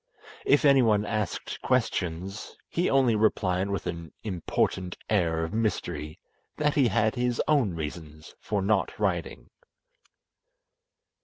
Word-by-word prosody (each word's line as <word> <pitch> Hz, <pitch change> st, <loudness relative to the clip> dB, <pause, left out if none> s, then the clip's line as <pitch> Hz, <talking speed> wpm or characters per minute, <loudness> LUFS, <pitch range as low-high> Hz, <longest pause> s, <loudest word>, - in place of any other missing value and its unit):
If 395 Hz, -, +4 dB
anyone 115 Hz, -7 st, +5 dB
asked 105 Hz, -4 st, -3 dB
questions, 90 Hz, +4 st, -2 dB
he 175 Hz, +2 st, 0 dB
only 130 Hz, -4 st, +4 dB
replied 100 Hz, -3 st, +1 dB
with 100 Hz, -1 st, -3 dB
an 85 Hz, -2 st, -5 dB
important 90 Hz, -1 st, -1 dB
air 85 Hz, -5 st, +2 dB
of 80 Hz, -, -4 dB
mystery 105 Hz, -8 st, -2 dB, 0.4 s
that 150 Hz, -1 st, +2 dB
he 135 Hz, -4 st, +4 dB
had 110 Hz, +1 st, +2 dB
his 125 Hz, -2 st, -1 dB
own 130 Hz, -, +2 dB
reasons 75 Hz, -1 st, -7 dB
for 100 Hz, -2 st, -2 dB
not 100 Hz, 0 st, +1 dB
riding. -, -, -2 dB
105 Hz, 120 wpm, -27 LUFS, 85-115 Hz, 0.4 s, anyone